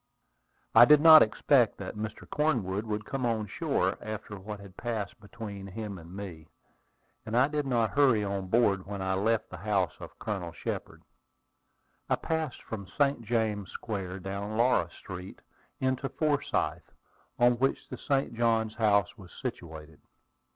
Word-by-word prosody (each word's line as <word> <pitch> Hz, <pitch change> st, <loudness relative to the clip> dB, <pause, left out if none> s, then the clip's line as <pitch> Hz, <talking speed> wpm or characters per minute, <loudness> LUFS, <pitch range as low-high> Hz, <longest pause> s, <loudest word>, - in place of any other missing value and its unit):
I 115 Hz, +1 st, +10 dB
did 150 Hz, +2 st, +7 dB
not 160 Hz, 0 st, +10 dB
expect 110 Hz, -, +3 dB
that -, -, -6 dB
Mr. 110 Hz, 0 st, -6 dB
Cornwood 115 Hz, -9 st, 0 dB
would 105 Hz, 0 st, -3 dB
come 135 Hz, -1 st, -3 dB
on 115 Hz, -3 st, 0 dB
shore 100 Hz, -, -1 dB
after 110 Hz, 0 st, -6 dB
what 105 Hz, +1 st, -7 dB
had 100 Hz, -2 st, -13 dB
passed 115 Hz, -3 st, -4 dB
between 100 Hz, -2 st, -8 dB
him 100 Hz, -1 st, -6 dB
and 85 Hz, +1 st, -13 dB
me, 90 Hz, -6 st, -8 dB, 0.8 s
and 115 Hz, +1 st, -2 dB
I 130 Hz, +2 st, +5 dB
did 150 Hz, -1 st, -2 dB
not 115 Hz, -4 st, +1 dB
hurry 130 Hz, -7 st, +4 dB
on 100 Hz, -1 st, -3 dB
board 100 Hz, -3 st, +2 dB
when 100 Hz, -1 st, -5 dB
I 95 Hz, 0 st, -1 dB
left 110 Hz, +3 st, 0 dB
the 95 Hz, -, -7 dB
house 100 Hz, 0 st, 0 dB
of -, -, -10 dB
Colonel 95 Hz, -6 st, -4 dB
Shepard. -, -, -5 dB, 1.1 s
I -, -, +4 dB
passed 160 Hz, -5 st, -3 dB
from 100 Hz, -4 st, -6 dB
St. 140 Hz, 0 st, +1 dB
James 110 Hz, -3 st, -1 dB
Square 95 Hz, -4 st, -5 dB
down 100 Hz, +3 st, -4 dB
Laura 115 Hz, -8 st, +3 dB
Street, 90 Hz, +1 st, -9 dB, 0.4 s
into 130 Hz, +1 st, 0 dB
Forsyth, 150 Hz, -2 st, -1 dB, 0.4 s
on 120 Hz, 0 st, +4 dB
which 135 Hz, +1 st, 0 dB
the -, -, -7 dB
St. 135 Hz, -3 st, 0 dB
Johns 115 Hz, -2 st, +1 dB
House 100 Hz, -4 st, +2 dB
was 90 Hz, -2 st, -13 dB
situated. 80 Hz, -, -7 dB
110 Hz, 155 wpm, -29 LUFS, 95-120 Hz, 1.1 s, I